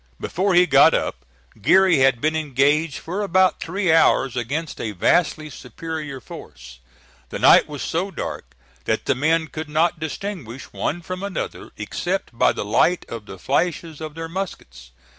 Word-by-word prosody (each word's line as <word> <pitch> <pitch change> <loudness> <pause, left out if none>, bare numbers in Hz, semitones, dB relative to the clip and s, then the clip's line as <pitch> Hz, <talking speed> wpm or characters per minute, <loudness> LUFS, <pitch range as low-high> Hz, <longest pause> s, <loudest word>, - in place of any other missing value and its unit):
Before 185 +2 0
he 180 +1 +6
got - - +6
up, - - -3 0.4
Geary 185 - +5
had 130 -2 +4
been 155 +5 0
engaged 145 +1 +1
for 185 +5 -4
about 185 -2 +2
three 185 0 -1
hours 135 -5 +3
against 140 +7 -3
a 110 - -3
vastly 155 - +1
superior 150 +1 -7
force. 60 - -12 0.5
The - - -5
night - - +6
was 145 -1 -6
so 180 +5 -2
dark - - -7 0.3
that - - -1
the - - +2
men 160 +5 +1
could 155 0 -7
not 165 +2 +1
distinguish 160 - -6
one 175 +3 -3
from 185 +2 -6
another 200 -1 -5
except 180 -8 -3
by - - +4
the - - -4
light 170 - +2
of 115 -3 -7
the 95 - -9
flashes 160 - -1
of 155 -1 -7
their 165 0 -5
muskets. 165 - -7
160 Hz, 160 wpm, -22 LUFS, 135-175 Hz, 0.5 s, he